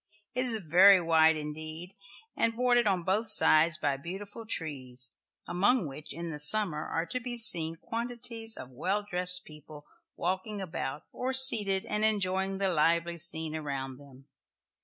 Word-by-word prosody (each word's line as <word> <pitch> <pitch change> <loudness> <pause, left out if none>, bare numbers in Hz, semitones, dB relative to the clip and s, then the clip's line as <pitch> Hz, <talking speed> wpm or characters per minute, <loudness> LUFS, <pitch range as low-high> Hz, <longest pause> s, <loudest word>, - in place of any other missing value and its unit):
It 255 +1 -2
is 235 -3 0
very 185 +2 +5
wide 160 -1 +3
indeed, 155 +3 -8 0.4
and 230 0 0
bordered 245 -1 +2
on 185 -3 0
both 205 +5 0
sides 165 -6 +6
by 145 -3 -2
beautiful 200 +8 -9
trees, 130 - -2 0.4
among 200 +2 +1
which 145 +2 -10
in 170 0 -7
the 150 - -7
summer 155 0 +3
are 165 - -3
to 255 - -5
be 240 0 -5
seen 165 -8 +3
quantities 230 +2 -5
of 130 - -10
well 195 +11 -3
dressed 180 -1 +2
people 150 -1 -14 0.3
walking 190 +3 -4
about 155 -6 -6
or 260 +1 -4
seated, 210 -7 +4
and 210 0 -3
enjoying 195 -2 0
the 195 0 -1
lively 170 +1 0
scene 160 -1 0
around 135 -4 -6
them. 135 -2 -17
180 Hz, 155 wpm, -28 LUFS, 155-215 Hz, 0.4 s, sides